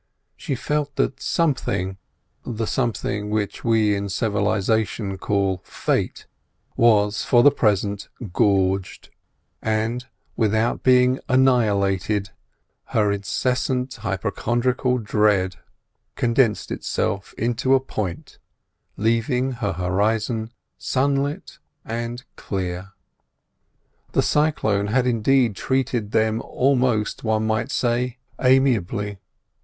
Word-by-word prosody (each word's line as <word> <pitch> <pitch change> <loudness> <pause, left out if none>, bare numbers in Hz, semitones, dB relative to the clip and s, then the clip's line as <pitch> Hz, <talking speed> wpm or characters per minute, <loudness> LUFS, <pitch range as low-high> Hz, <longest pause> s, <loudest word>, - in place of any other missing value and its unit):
She 135 - -3
felt 145 +2 -2
that - - -1
something—the 115 - -3
something 105 -4 -2
which 105 -1 -2
we 110 -3 +3
in 100 0 -3
civilisation 105 -1 0
call 95 -2 0
Fate—was 105 -3 -1
for 120 -1 +4
the 145 - +8
present 100 -5 0 0.2
gorged; 95 -2 +1 0.5
and, 110 +3 -1 0.3
without 110 +1 +1
being 125 0 +4
annihilated, 105 -6 +2 0.5
her 105 -2 +1
incessant 125 +5 -1
hypochondriacal 120 +5 0
dread 105 -4 +1 0.6
condensed 120 -2 +1
itself 95 0 -2
into 120 +3 +2
a - - +4
point, 100 -10 -5 0.6
leaving 115 +4 +1
her 115 -5 -2
horizon 105 +5 0 0.3
sunlit 140 +2 -1 0.3
and 115 +2 -4
clear. 95 0 -4 1.2
The - - +3
cyclone 110 -10 +1
had 125 +4 +2
indeed 120 -1 +2
treated 125 -3 -1
them 110 +1 +1
almost, 125 -5 +1
one 110 -1 +1
might 110 +4 0
say, 125 -1 0 0.2
amiably. 115 -6 +2
110 Hz, 90 wpm, -23 LUFS, 100-125 Hz, 1.2 s, the